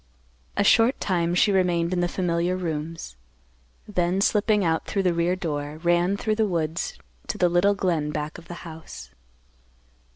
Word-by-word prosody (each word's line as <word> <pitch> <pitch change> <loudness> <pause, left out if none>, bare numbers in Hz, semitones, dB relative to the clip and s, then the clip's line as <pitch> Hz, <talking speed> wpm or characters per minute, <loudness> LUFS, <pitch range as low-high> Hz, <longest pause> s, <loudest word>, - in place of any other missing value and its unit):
A - - +3
short 230 +5 +4
time 175 -2 0
she 200 - +4
remained 175 -2 +1
in 180 - 0
the 175 - +2
familiar 175 0 0
rooms, 160 - -5 0.7
then, 180 -2 0
slipping 210 0 +2
out 160 -1 0
through 195 - -1
the 180 -2 +2
rear 170 +2 +1
door, 150 -4 -4
ran 175 +3 +2
through 215 +1 -1
the 220 -1 +2
woods 165 -3 -2 0.3
to - - -3
the 180 - +3
little 185 +4 +3
glen 170 -6 0
back 150 +2 -4
of 170 - -16
the 175 +1 -9
house. 160 - -10
175 Hz, 165 wpm, -25 LUFS, 165-190 Hz, 0.7 s, short